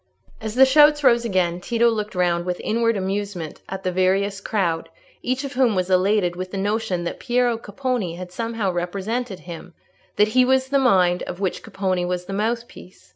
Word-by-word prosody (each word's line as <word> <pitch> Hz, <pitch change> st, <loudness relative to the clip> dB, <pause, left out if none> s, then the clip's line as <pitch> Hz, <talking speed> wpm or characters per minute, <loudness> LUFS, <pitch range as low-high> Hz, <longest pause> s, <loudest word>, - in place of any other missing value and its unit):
As 220 Hz, 0 st, -5 dB
the 265 Hz, +1 st, +7 dB
shouts 295 Hz, +2 st, +5 dB
rose 240 Hz, -2 st, +4 dB
again, 180 Hz, -4 st, 0 dB
Tito 235 Hz, +4 st, +2 dB
looked 215 Hz, -3 st, -1 dB
round 175 Hz, -1 st, +1 dB
with 180 Hz, 0 st, -3 dB
inward 230 Hz, 0 st, +1 dB
amusement 195 Hz, -4 st, -4 dB
at 190 Hz, 0 st, -6 dB
the 185 Hz, -, 0 dB
various 195 Hz, +2 st, +1 dB
crowd, 175 Hz, -7 st, -1 dB, 0.3 s
each 255 Hz, +2 st, -2 dB
of 275 Hz, -, -5 dB
whom 250 Hz, -4 st, +2 dB
was 185 Hz, 0 st, -1 dB
elated 185 Hz, -1 st, +2 dB
with 185 Hz, +1 st, -5 dB
the 195 Hz, -, -5 dB
notion 205 Hz, -2 st, -1 dB
that 170 Hz, -, -5 dB
Piero 245 Hz, -1 st, +1 dB
Capponi 225 Hz, -4 st, -3 dB
had 180 Hz, 0 st, -8 dB
somehow 225 Hz, -2 st, -2 dB
represented 195 Hz, +5 st, -3 dB
him—that 180 Hz, +4 st, -4 dB
he 255 Hz, +3 st, +4 dB
was 260 Hz, +1 st, +2 dB
the 280 Hz, 0 st, +3 dB
mind 185 Hz, -8 st, +3 dB
of 180 Hz, -, -6 dB
which 190 Hz, -3 st, -2 dB
Capponi 185 Hz, -2 st, -2 dB
was 180 Hz, 0 st, -2 dB
the 195 Hz, -, -6 dB
mouthpiece. 225 Hz, -2 st, -4 dB
200 Hz, 180 wpm, -22 LUFS, 180-235 Hz, 0.3 s, the